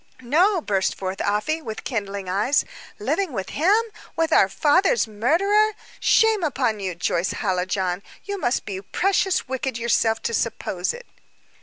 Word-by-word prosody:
"No!" 345 Hz, -, +3 dB
burst 195 Hz, -7 st, 0 dB
forth 190 Hz, 0 st, -4 dB
Afy, 210 Hz, +11 st, 0 dB
with 220 Hz, -7 st, -7 dB
kindling 200 Hz, -5 st, -4 dB
eyes. 210 Hz, +10 st, +2 dB, 0.3 s
"Living 385 Hz, -7 st, -1 dB
with 195 Hz, -4 st, -4 dB
him 380 Hz, +9 st, +3 dB, 0.4 s
with 325 Hz, 0 st, +1 dB
our 190 Hz, -, +5 dB
father's 295 Hz, -, +3 dB
murderer! 390 Hz, -, +2 dB, 0.3 s
Shame 445 Hz, -4 st, +3 dB
upon 250 Hz, -7 st, 0 dB
you, 185 Hz, -3 st, -3 dB
Joyce 170 Hz, +1 st, -1 dB
Hallijohn! 185 Hz, -1 st, -1 dB, 0.2 s
You 400 Hz, -1 st, -4 dB
must 245 Hz, -7 st, 0 dB
be 190 Hz, -2 st, -5 dB
precious 375 Hz, -, 0 dB
wicked 260 Hz, -1 st, -3 dB
yourself 225 Hz, -1 st, +1 dB
to 230 Hz, -, -2 dB
suppose 195 Hz, -5 st, -1 dB
it." 485 Hz, 0 st, -10 dB
235 Hz, 145 wpm, -23 LUFS, -, 0.4 s, our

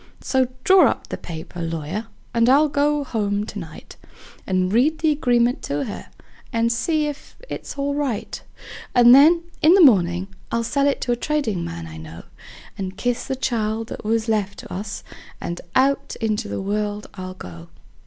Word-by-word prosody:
So 260 Hz, -1 st, +1 dB, 0.2 s
draw 380 Hz, 0 st, +6 dB
up -, -, -4 dB
the -, -, -3 dB
paper, 170 Hz, +1 st, -8 dB
lawyer, 165 Hz, +6 st, -4 dB, 0.3 s
and 230 Hz, 0 st, +3 dB
I'll 295 Hz, +3 st, +5 dB
go 290 Hz, +1 st, +1 dB
home 205 Hz, -5 st, -1 dB
to -, -, -7 dB
night, -, -, -11 dB, 0.5 s
And 185 Hz, 0 st, +1 dB
read 285 Hz, +8 st, +3 dB
the 315 Hz, -1 st, +2 dB
agreement 245 Hz, -4 st, +2 dB
to 145 Hz, +1 st, -2 dB
her, 210 Hz, -, -7 dB, 0.4 s
and 230 Hz, -1 st, +1 dB
see 300 Hz, +6 st, 0 dB
if 295 Hz, -1 st, -7 dB
it's -, -, -6 dB
all 280 Hz, 0 st, -1 dB
right; 280 Hz, -7 st, -3 dB, 0.5 s
And 240 Hz, 0 st, +8 dB
then, 320 Hz, +6 st, +7 dB, 0.2 s
in 325 Hz, +4 st, +7 dB
the 390 Hz, -, +6 dB
mornin', 180 Hz, -5 st, +3 dB, 0.2 s
I'll 230 Hz, 0 st, 0 dB
sell 280 Hz, +4 st, +2 dB
to 255 Hz, -, -3 dB
a -, -, +3 dB
tradin' 240 Hz, -, -1 dB
man 85 Hz, 0 st, -6 dB
I 80 Hz, -1 st, -9 dB
know, 80 Hz, +1 st, -10 dB, 0.6 s
And 190 Hz, 0 st, -5 dB
kiss 245 Hz, +3 st, -1 dB
the 265 Hz, -, -2 dB
child 225 Hz, -3 st, -2 dB
that -, -, -7 dB
was 225 Hz, +1 st, 0 dB
left 205 Hz, -3 st, 0 dB
to -, -, -10 dB
us, 195 Hz, +1 st, -5 dB, 0.4 s
and 175 Hz, 0 st, -5 dB
out 275 Hz, +1 st, +2 dB
in 220 Hz, -2 st, +1 dB
the 210 Hz, -1 st, -4 dB
world 205 Hz, +1 st, -2 dB
I'll 185 Hz, -1 st, -7 dB
go. 85 Hz, -, -10 dB
230 Hz, 175 wpm, -22 LUFS, 190-275 Hz, 0.6 s, And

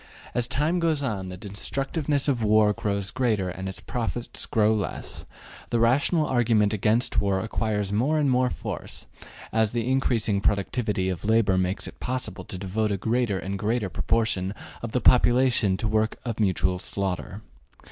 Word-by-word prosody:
As 120 Hz, -1 st, +1 dB
time 150 Hz, +7 st, 0 dB
goes 160 Hz, -4 st, +1 dB
on, 100 Hz, -8 st, -3 dB
the 90 Hz, -, -7 dB
destructiveness 135 Hz, -, -2 dB
of 130 Hz, -5 st, +1 dB
war 105 Hz, -1 st, +4 dB
grows 100 Hz, -1 st, -2 dB
greater 110 Hz, -8 st, 0 dB
and 95 Hz, +1 st, -5 dB
its 95 Hz, -, -5 dB
profits 120 Hz, -1 st, -3 dB
grow 110 Hz, 0 st, +3 dB
less: 105 Hz, -2 st, -4 dB, 0.4 s
the 120 Hz, -, +1 dB
rational 140 Hz, +7 st, +3 dB
argument 115 Hz, -5 st, +2 dB
against 110 Hz, +4 st, +2 dB
war 100 Hz, -1 st, +1 dB
acquires 105 Hz, -1 st, -1 dB
more 135 Hz, +9 st, +2 dB
and 150 Hz, -2 st, +2 dB
more 125 Hz, -1 st, +3 dB
force -, -, -6 dB, 0.5 s
as 110 Hz, -1 st, +2 dB
the 120 Hz, -1 st, -1 dB
increasing 115 Hz, -6 st, +1 dB
productivity 100 Hz, 0 st, 0 dB
of 90 Hz, -3 st, -4 dB
labor 110 Hz, -2 st, +3 dB
makes 95 Hz, +1 st, -1 dB
it -, -, -11 dB
possible 125 Hz, -7 st, -3 dB
to 95 Hz, -, -7 dB
devote 100 Hz, +3 st, -1 dB
a 100 Hz, -, 0 dB
greater 115 Hz, 0 st, 0 dB
and 95 Hz, +1 st, -4 dB
greater 110 Hz, -1 st, 0 dB
proportion 105 Hz, -3 st, 0 dB, 0.3 s
of 115 Hz, -, -5 dB
the 125 Hz, -, 0 dB
population 120 Hz, -5 st, +4 dB
to 110 Hz, -, -4 dB
the -, -, +1 dB
work 110 Hz, 0 st, +1 dB
of 115 Hz, -2 st, -3 dB
mutual 95 Hz, -3 st, +1 dB
slaughter. 100 Hz, +2 st, -3 dB
110 Hz, 165 wpm, -25 LUFS, 100-125 Hz, 0.5 s, war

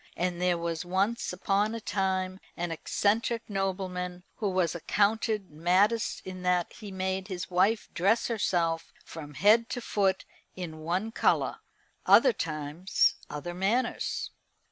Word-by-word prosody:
And 180 Hz, 0 st, -1 dB
there 180 Hz, -1 st, +2 dB
was 170 Hz, -1 st, -3 dB
once 195 Hz, +6 st, 0 dB
upon 200 Hz, +4 st, 0 dB
a -, -, -3 dB
time 190 Hz, -2 st, -1 dB, 0.2 s
an 175 Hz, 0 st, -2 dB
eccentric 220 Hz, +7 st, 0 dB
nobleman 185 Hz, -2 st, -3 dB
who 210 Hz, -, 0 dB
was 185 Hz, -3 st, +1 dB
accounted 210 Hz, +3 st, 0 dB
maddest 185 Hz, +8 st, +2 dB
in 185 Hz, -1 st, -7 dB
that 180 Hz, -1 st, +1 dB
he 210 Hz, -, -9 dB
made 190 Hz, 0 st, -2 dB
his 180 Hz, -4 st, -5 dB
wife 200 Hz, +5 st, +2 dB
dress 200 Hz, +6 st, +2 dB
herself 170 Hz, -7 st, 0 dB
from 150 Hz, -3 st, -9 dB
head 220 Hz, -, +5 dB
to -, -, -3 dB
foot 195 Hz, -5 st, 0 dB, 0.3 s
in 165 Hz, -4 st, -6 dB
one 180 Hz, +8 st, -1 dB
colour. -, -, +1 dB, 0.5 s
Other -, -, +7 dB
times, 155 Hz, -, 0 dB, 0.2 s
other 150 Hz, +4 st, -5 dB
manners. 200 Hz, +8 st, -1 dB
185 Hz, 135 wpm, -29 LUFS, 175-205 Hz, 0.5 s, Other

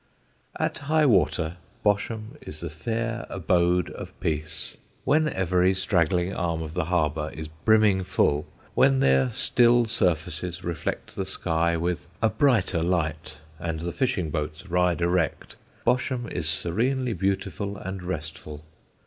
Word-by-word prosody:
At -, -, -1 dB
high 155 Hz, -1 st, +4 dB
water 90 Hz, -, +2 dB, 0.3 s
Bosham 110 Hz, +4 st, 0 dB
is 75 Hz, -, -5 dB
the 85 Hz, -2 st, -4 dB
fair 115 Hz, +7 st, -3 dB
abode 90 Hz, -1 st, +1 dB
of -, -, -9 dB
peace. 75 Hz, -1 st, -3 dB, 0.3 s
When 155 Hz, +2 st, +3 dB
every 90 Hz, -, +2 dB
straggling 90 Hz, -1 st, +1 dB
arm 85 Hz, -3 st, -1 dB
of 80 Hz, 0 st, -7 dB
the 90 Hz, -2 st, -1 dB
harbour 75 Hz, -3 st, 0 dB
is 80 Hz, +1 st, -6 dB, 0.2 s
brimming 110 Hz, -3 st, +5 dB
full, 75 Hz, -5 st, +1 dB, 0.3 s
when 135 Hz, 0 st, +4 dB
their 65 Hz, -, +3 dB
still 120 Hz, 0 st, +4 dB
surfaces 90 Hz, -4 st, 0 dB
reflect 85 Hz, -2 st, -4 dB
the 95 Hz, -, -1 dB
sky 85 Hz, -3 st, 0 dB
with 85 Hz, +1 st, -2 dB
a 110 Hz, -, +3 dB
brighter 110 Hz, -, +2 dB
light, 80 Hz, -3 st, -1 dB, 0.2 s
and 80 Hz, -2 st, -3 dB
the 85 Hz, 0 st, -3 dB
fishing 95 Hz, -, 0 dB
boats 75 Hz, +3 st, -4 dB
ride 90 Hz, -1 st, +1 dB
erect, 85 Hz, -2 st, 0 dB, 0.3 s
Bosham 125 Hz, 0 st, +1 dB
is 80 Hz, -3 st, 0 dB
serenely 120 Hz, -, 0 dB
beautiful 100 Hz, +2 st, -2 dB
and 95 Hz, 0 st, -6 dB
restful. 75 Hz, -3 st, -6 dB
90 Hz, 135 wpm, -26 LUFS, 80-110 Hz, 0.3 s, brimming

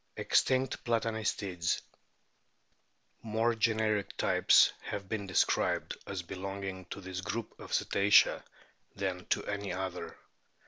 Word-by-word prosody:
EXTINCT 130 Hz, 0 st, +1 dB
PLATANISTIDS 110 Hz, -6 st, -1 dB, 1.4 s
More 115 Hz, +1 st, +1 dB
generic 110 Hz, -2 st, 0 dB
types -, -, +5 dB
have 100 Hz, -2 st, -5 dB
been 100 Hz, -1 st, -3 dB
described 90 Hz, -, +1 dB
as 95 Hz, -2 st, -4 dB
be 85 Hz, -, -8 dB
longing 95 Hz, 0 st, -5 dB
to 95 Hz, -, -8 dB
this 95 Hz, -1 st, -5 dB
group 115 Hz, +4 st, -4 dB
of -, -, -9 dB
the -, -, +1 dB
Cetacea 100 Hz, +1 st, +4 dB, 0.5 s
than 90 Hz, -2 st, -3 dB
to -, -, 0 dB
any 100 Hz, -1 st, -3 dB
other. 95 Hz, -1 st, -5 dB
100 Hz, 120 wpm, -31 LUFS, 95-110 Hz, 1.4 s, types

